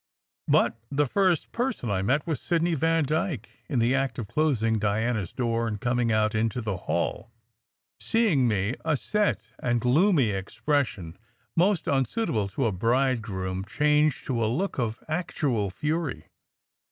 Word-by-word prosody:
But 115 - +3
the 145 +1 +1
first 185 +3 +1
person 235 - -2
I 95 -2 0
met 130 +9 +1
was 155 -6 -2
Sidney 170 0 +1
Vandyke 160 - 0 0.2
in 140 - -1
the 120 +2 +3
act 135 -3 0
of 115 - -4
closing 115 -6 +1
Diana 110 +2 0
s 90 - -7
door 115 -2 -1
and 105 -2 -3
coming 120 0 +1
out 110 0 +2
into 110 +2 0
the 110 -4 -2
hall. 85 +7 -1 0.7
Seeing 195 - +2
me, 105 0 0
a 160 -3 +1
set 210 +8 0 0.2
and 120 -1 +1
gloomy 135 - +3
expression, 95 - -2 0.4
most 180 +1 +2
unsuitable 135 - 0
to 125 +6 -2
a 115 - +2
bridegroom, 105 -4 0
changed 150 +6 +1
to 120 -4 0
a 110 - +1
look 185 +4 -2
of 115 -2 -2
actual 145 - -1
fury. 150 - -2
125 Hz, 150 wpm, -26 LUFS, 110-155 Hz, 0.7 s, But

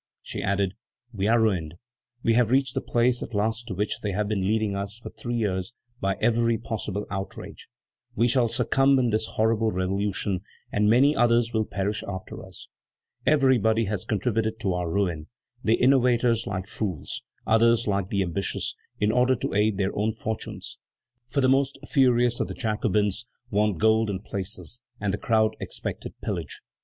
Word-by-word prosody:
She - - -5
added: 100 -1 0 0.4
"We 100 -1 -1
are 115 +1 +4
ruined. 90 -8 0 0.5
We 115 - +3
have 120 -1 +3
reached 130 0 +2
the - - -1
place 120 +1 +1
at - - -6
last 110 +3 0
to 95 - -4
which 105 +3 -1
they 105 -4 -3
have 105 +2 0
been 100 -3 0
leading 110 -1 +1
us 100 +2 0
for 120 - -9
three 120 0 -5
years 100 -1 -1 0.2
by 95 0 0
every 115 0 +2
possible 105 -2 -4
outrage; 95 0 -6 0.5
we 115 +3 +3
shall 125 -1 +3
succumb 135 +4 +3
in 125 -3 +2
this 110 +1 0
horrible 110 0 +2
revolution, 95 0 -1 0.3
and 105 0 +2
many 135 +6 +5
others 120 -1 +3
will 110 -1 +1
perish 100 +2 -2
after 95 -1 -6
us. 95 -2 -12 0.6
Everybody 125 -6 +4
has 100 -2 -2
contributed 110 +1 -1
to 95 -4 0
our 90 -1 -2
ruin: 85 -4 -1 0.4
the 110 - +4
innovators 125 -3 +3
like 95 -2 -3
fools, 100 -6 -4 0.2
others 115 +1 +4
like 100 -2 0
the 100 -1 +1
ambitious, 95 +2 -2 0.2
in 105 +1 +2
order 125 +2 +3
to - - -3
aid 105 0 +2
their 95 -1 -1
own 110 +2 0
fortunes; 110 +1 -5 0.5
for 140 +3 0
the 130 - +4
most 135 +1 +2
furious 125 -3 +3
of - - 0
the - - -6
Jacobins 105 -2 0 0.2
wanted 105 -4 +1
gold 110 0 +3
and 95 0 -3
places, 100 +3 -5 0.2
and 100 -2 -1
the 105 - -2
crowd 110 -1 +2
expected - - -5
pillage. - - -4
110 Hz, 170 wpm, -26 LUFS, 100-120 Hz, 0.6 s, many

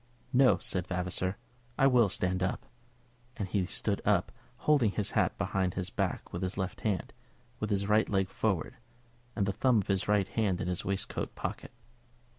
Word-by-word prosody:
"No," 130 0 +6
said 90 -1 -3
Vavasor; 90 +1 -2 0.4
"I 135 - +4
will 125 -6 +5
stand 90 0 0
up." 95 - -1 0.7
And 100 - -2
he 95 -2 0
stood - - -1
up, - - +2 0.3
holding 145 -8 +3
his 100 0 -2
hat - - +1
behind 95 -2 0
his 95 0 -3
back - - -2
with 85 - -3
his 95 +1 -2
left 95 -1 -3
hand, 105 -4 -1 0.5
with 105 - -2
his 100 -1 +1
right 105 +1 +3
leg 95 -2 +1
forward, 100 +3 -1 0.6
and 100 - +1
the 100 - 0
thumb 125 +1 +3
of 100 - -2
his 95 -1 +1
right 105 -2 +3
hand 100 -5 0
in 90 - -2
his 90 -1 -2
waistcoat 100 0 -2
pocket. - - -5
95 Hz, 180 wpm, -31 LUFS, 90-110 Hz, 0.7 s, No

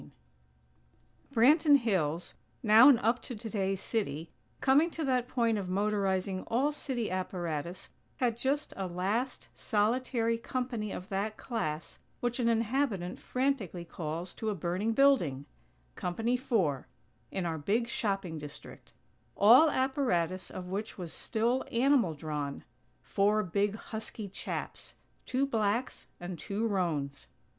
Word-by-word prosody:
XVI - - -15 1.2
Branton 290 +5 +6
Hills, 180 - -1 0.3
now 225 +4 +8
an 270 - +7
up 235 +1 +1
to 245 - -6
today 205 -3 -2
city, 170 -6 -3 0.3
coming 285 +6 +4
to 320 -2 -4
that 250 -2 +1
point 230 -4 +1
of 190 - -4
motorizing 195 -1 0
all 265 +6 +2
city 255 -7 -3
apparatus, 175 -2 -4 0.3
had 240 -3 +1
just 275 +5 -1
a 190 -1 -3
last, 200 +9 -2
solitary 230 +1 0
company 240 -4 -3
of 185 +3 -7
that 205 +2 -2
class 165 - -4 0.2
which 240 +1 -1
an 235 -1 +2
inhabitant 225 -5 0
frantically 250 - -1
calls 165 +2 -5
to 220 - -3
a 210 - -1
burning 185 +6 -1
building 220 - +3 0.5
Company 225 - -1
Four, 195 - 0 0.4
in 190 - -3
our 160 -2 -2
big 220 +10 +1
shopping 195 -8 -2
district; 145 -1 -11 0.4
all 245 +10 +8
apparatus 250 - 0
of 185 - -7
which 200 +4 -4
was 175 -4 -5
still 240 +3 0
animal 240 - +3
drawn; 145 -2 -4 0.4
four 210 +2 +2
big, 200 +3 0
husky 220 -1 -6
chaps: 190 - -6 0.3
two 260 +2 +1
blacks 220 - -1
and 175 -1 -6
two 205 +3 -2
roans. 160 -9 -1
215 Hz, 130 wpm, -31 LUFS, 180-245 Hz, 1.2 s, now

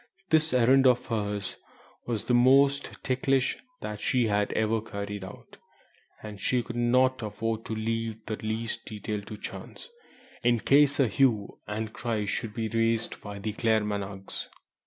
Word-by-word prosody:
This 160 0 +4
errand 130 +2 +5
of 125 -1 +3
hers 105 -3 -3 0.5
was 115 -4 -1
the 125 - 0
most 135 +3 +4
ticklish 130 0 +1 0.4
she 125 +1 +2
had 105 -1 +1
ever 110 0 +1
carried 100 -2 -5
out, 95 - -11 0.7
and 105 -2 -8
she 125 -2 +1
could 120 0 -7
not 125 +2 +3
afford 110 +1 -3
to 110 - -3
leave 110 0 -3
the 110 - -3
least 110 +1 -3
detail 105 0 -4
to 105 +1 -9
chance, 475 - -8 0.5
in 120 -1 +3
case 145 0 +4
a 135 - +5
hue 110 -2 +1
and 110 +1 -4
cry 115 -4 -2
should 105 +1 -3
be 115 -1 -1
raised 115 0 0
by 100 -1 -7
the 105 +2 -3
Claremanaghs. 105 -4 -1
115 Hz, 150 wpm, -28 LUFS, 105-125 Hz, 0.7 s, errand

